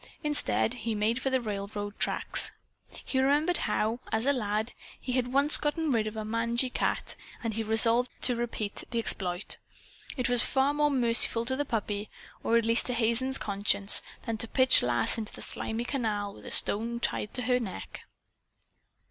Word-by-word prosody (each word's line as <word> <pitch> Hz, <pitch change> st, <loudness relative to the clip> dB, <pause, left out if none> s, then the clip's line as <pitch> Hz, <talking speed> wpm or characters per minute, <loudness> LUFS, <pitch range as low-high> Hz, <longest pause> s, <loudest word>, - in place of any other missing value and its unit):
Instead 110 Hz, -, +1 dB
he 225 Hz, -1 st, -4 dB
made 220 Hz, +4 st, 0 dB
for 270 Hz, -, -1 dB
the 260 Hz, 0 st, +1 dB
railroad 205 Hz, -2 st, -5 dB
tracks. -, -, +1 dB, 0.6 s
He 260 Hz, -, -1 dB
remembered 295 Hz, +6 st, +2 dB
how, 225 Hz, +3 st, -1 dB
as 220 Hz, +2 st, -1 dB
a 280 Hz, -, +3 dB
lad, 215 Hz, -2 st, -2 dB, 0.3 s
he 255 Hz, -, -6 dB
had 250 Hz, -1 st, -1 dB
once 280 Hz, +3 st, +6 dB
gotten 310 Hz, +1 st, -1 dB
rid 220 Hz, -3 st, 0 dB
of 215 Hz, +1 st, -6 dB
a 215 Hz, -, -4 dB
mangy 235 Hz, +3 st, -1 dB
cat, -, -, -2 dB, 0.3 s
and 225 Hz, -1 st, -2 dB
he 225 Hz, -, -2 dB
resolved 230 Hz, +3 st, +3 dB
to 250 Hz, -, +4 dB
repeat 230 Hz, -3 st, -4 dB
the 235 Hz, -, -4 dB
exploit. 185 Hz, -4 st, -1 dB, 0.6 s
It 250 Hz, -, -1 dB
was 245 Hz, -1 st, +5 dB
far 270 Hz, +1 st, +1 dB
more 295 Hz, 0 st, +1 dB
merciful 235 Hz, -3 st, +4 dB
to 260 Hz, +2 st, 0 dB
the 290 Hz, +2 st, -2 dB
puppy 210 Hz, -3 st, -3 dB, 0.3 s
or 230 Hz, -, +2 dB
at 230 Hz, -, +1 dB
least, 230 Hz, +1 st, +2 dB
to 250 Hz, -, -2 dB
Hazen's 240 Hz, +3 st, +1 dB
conscience, 200 Hz, 0 st, +3 dB, 0.2 s
than 225 Hz, -3 st, -4 dB
to 230 Hz, -, +1 dB
pitch 260 Hz, +2 st, +4 dB
Lass 120 Hz, -, 0 dB
into 215 Hz, -, -6 dB
the -, -, -11 dB
slimy 225 Hz, +2 st, -4 dB
canal 215 Hz, -7 st, -3 dB
with -, -, -14 dB
a -, -, -6 dB
stone 230 Hz, +3 st, +3 dB
tied 210 Hz, -, -3 dB
to 250 Hz, -, -1 dB
her 250 Hz, +2 st, +1 dB
neck. 190 Hz, -, -8 dB
230 Hz, 180 wpm, -28 LUFS, 215-255 Hz, 0.6 s, once